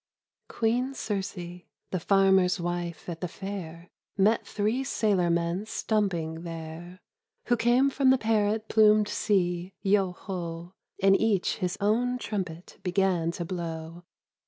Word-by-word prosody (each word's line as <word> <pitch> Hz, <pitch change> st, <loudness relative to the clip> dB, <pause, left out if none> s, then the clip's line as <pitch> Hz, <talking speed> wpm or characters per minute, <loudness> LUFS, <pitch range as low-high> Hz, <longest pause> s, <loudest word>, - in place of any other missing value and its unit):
QIIEEN 245 Hz, +4 st, 0 dB
CIRCE, 185 Hz, -5 st, -4 dB, 0.3 s
the 185 Hz, -, -1 dB
farmer's 190 Hz, 0 st, +3 dB
wife 175 Hz, -1 st, -4 dB
at 170 Hz, -2 st, -6 dB
the 180 Hz, -, -1 dB
Fair. 175 Hz, -2 st, -7 dB, 0.3 s
Mot 210 Hz, +3 st, +3 dB
three 215 Hz, +6 st, 0 dB
sailor 200 Hz, -8 st, +1 dB
mon 170 Hz, +4 st, 0 dB
stumping 175 Hz, -8 st, -1 dB
there, 165 Hz, +1 st, -8 dB, 0.5 s
Who 240 Hz, -, +5 dB
came 245 Hz, +4 st, +3 dB
from 270 Hz, -1 st, +3 dB
the 265 Hz, -, +6 dB
parrot 220 Hz, -1 st, +1 dB
plumed 215 Hz, -1 st, +5 dB
sea, 180 Hz, -2 st, 0 dB
Yeo 195 Hz, -2 st, +2 dB
Ho! 175 Hz, -2 st, -6 dB, 0.3 s
And 195 Hz, 0 st, +6 dB
each 215 Hz, -4 st, +1 dB
his 180 Hz, -1 st, -2 dB
own 240 Hz, +5 st, +1 dB
trumpet 185 Hz, -8 st, -5 dB
began 180 Hz, -2 st, +1 dB
to 175 Hz, -, -4 dB
blow. 165 Hz, -1 st, -5 dB
190 Hz, 130 wpm, -28 LUFS, 175-215 Hz, 0.5 s, the